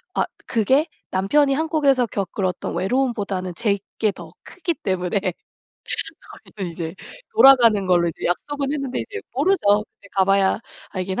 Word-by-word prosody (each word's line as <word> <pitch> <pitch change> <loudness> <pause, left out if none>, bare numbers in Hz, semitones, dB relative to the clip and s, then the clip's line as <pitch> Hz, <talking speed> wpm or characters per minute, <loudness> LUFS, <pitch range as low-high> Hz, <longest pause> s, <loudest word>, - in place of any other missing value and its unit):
아 - - +2 0.2
그게 265 - +2 0.2
남편이 275 +10 +3
한국에서 285 -4 +2
겪을 195 -1 -3
어떤 180 -1 -3
외로움보다는 200 -5 -1
제 210 -4 +1 0.2
게 215 -2 +3
더 - - -10
크기 340 -2 -3
때문에 185 - -1 1.4
저희는 185 -4 -4
이제 165 +1 -5 0.4
돌아가는 235 - +7
걸로 175 -2 +3
이제 165 - -4
약속은 280 +10 -2
했는데 275 -3 -2
이제 420 +1 -6
모르죠. 245 - +3
그때 200 - -20
가봐야 195 +1 +3 0.3
알긴 190 +3 -3
210 Hz, 315 characters per minute, -22 LUFS, 190-275 Hz, 1.4 s, 돌아가는